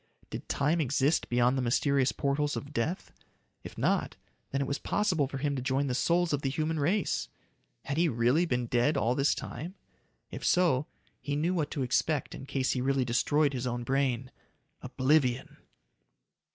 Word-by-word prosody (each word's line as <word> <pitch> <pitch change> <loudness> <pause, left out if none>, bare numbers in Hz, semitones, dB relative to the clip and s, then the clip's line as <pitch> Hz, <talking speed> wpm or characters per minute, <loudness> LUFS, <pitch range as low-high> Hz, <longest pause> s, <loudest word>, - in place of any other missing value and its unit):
Did - - -7
time 155 +4 +1
exist 140 +2 +1
beyond 125 +1 +3
the 130 - 0
mysterious 130 +2 +2
portals 145 +1 -1
of 145 +1 -7
death? 155 +10 -2 0.5
If - - -10
not, - - 0 0.3
then 135 - -2
it 140 - 0
was 140 +2 -2
possible 180 -9 +1
for 140 - -6
him 140 +1 -1
to 130 - -3
join 135 +2 0
the 130 - -1
souls 170 +5 +1
of 145 - 0
the 135 - 0
human 155 +3 -1
race. 185 +8 0 0.6
Had 140 +1 -3
he 170 0 +3
really 125 +8 +2
been 125 -4 0
dead 120 +5 +1
all 120 -2 +2
this 140 +2 +2
time? 175 +6 -7 0.6
If - - -7
so, 160 -6 +3 0.3
he 145 -1 -2
knew 165 +5 +1
what 160 -5 -1
to 140 - -2
expect 140 +4 0
in 135 - -9
case 135 -2 0
he 125 - -1
really 135 0 +1
destroyed 145 +4 +2
his 125 -1 -2
own 120 0 -3
brain. 130 -1 0 0.5
Oblivion! 130 0 +1
140 Hz, 180 wpm, -29 LUFS, 130-155 Hz, 0.6 s, beyond